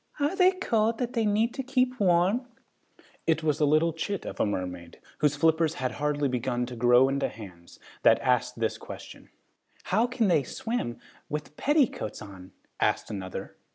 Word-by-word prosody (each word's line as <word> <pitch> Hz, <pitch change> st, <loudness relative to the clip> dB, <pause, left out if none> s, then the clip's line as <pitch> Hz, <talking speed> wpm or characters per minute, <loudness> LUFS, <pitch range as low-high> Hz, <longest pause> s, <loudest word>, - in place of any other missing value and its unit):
"Are 290 Hz, +6 st, +1 dB
they 370 Hz, 0 st, +5 dB
cold 225 Hz, -, +1 dB
that 245 Hz, +1 st, -3 dB
they 230 Hz, -3 st, +1 dB
have 215 Hz, +3 st, +2 dB
to 270 Hz, -, -4 dB
keep 255 Hz, -1 st, 0 dB
warm?" 190 Hz, +6 st, +2 dB, 0.8 s
It 160 Hz, -1 st, +2 dB
was 150 Hz, -1 st, +1 dB
a 150 Hz, -, +3 dB
little 155 Hz, +3 st, +3 dB
chit 195 Hz, +4 st, -4 dB
of -, -, -7 dB
a -, -, +2 dB
mermaid, 90 Hz, -3 st, -5 dB, 0.2 s
whose 150 Hz, -1 st, +2 dB
flippers 160 Hz, +1 st, +2 dB
had 130 Hz, 0 st, -2 dB
hardly 145 Hz, -1 st, 0 dB
begun 125 Hz, -1 st, -1 dB
to 125 Hz, 0 st, -8 dB
grow 120 Hz, +2 st, +5 dB
into 140 Hz, +1 st, 0 dB
hands, 90 Hz, -6 st, -12 dB, 0.2 s
that -, -, +5 dB
asked -, -, +1 dB
this -, -, -1 dB
question. -, -, -10 dB, 0.5 s
"How 220 Hz, +6 st, +2 dB
can 240 Hz, -3 st, 0 dB
they 170 Hz, -5 st, +4 dB
swim 180 Hz, -, -4 dB, 0.3 s
with 150 Hz, 0 st, -5 dB
petticoats 280 Hz, -, +1 dB
on?" 95 Hz, -3 st, -11 dB, 0.3 s
asked -, -, 0 dB
another. 95 Hz, -3 st, -6 dB
155 Hz, 170 wpm, -27 LUFS, -, 0.8 s, they